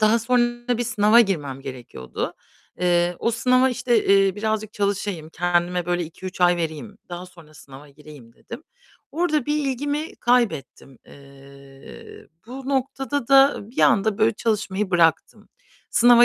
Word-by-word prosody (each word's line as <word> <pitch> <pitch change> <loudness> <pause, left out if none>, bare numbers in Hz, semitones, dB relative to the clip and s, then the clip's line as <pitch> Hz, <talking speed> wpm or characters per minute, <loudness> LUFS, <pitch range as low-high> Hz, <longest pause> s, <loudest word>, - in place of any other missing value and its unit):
Daha 215 +2 +4
sonra 240 0 0
bir 240 - -1
sınava 220 0 +4
girmem 145 - -1
gerekiyordu. 125 - -7 0.5
Eee, 175 0 +1
o 230 - 0
sınava 255 +3 +2
işte, 245 -3 0
eee, 195 -1 +3
birazcık 215 0 -2
çalışayım, 200 -5 -3
kendime 175 0 -1
böyle 175 -1 -1
2-3 180 +3 -9
ay 175 0 +4
vereyim, 170 +6 -5
daha 175 +1 -7
sonra 165 -4 -18
sınava 140 +1 -14
gireyim 145 -4 -15
dedim. - - -11 0.5
Orada 310 -4 0
bir 295 - 0
ilgimi 290 +4 -3
kaybettim. 165 - -1
Eee, 140 0 -15 0.2
bu 260 +2 -8
noktada 270 0 -2
da 275 +1 +5
bir - - -13
anda 215 -1 +3
böyle 220 +1 +3
çalışmayı 210 -3 -2
bıraktım. 165 -2 +1 0.4
Sınava 240 0 +6
200 Hz, 135 wpm, -22 LUFS, 165-240 Hz, 0.5 s, Sınava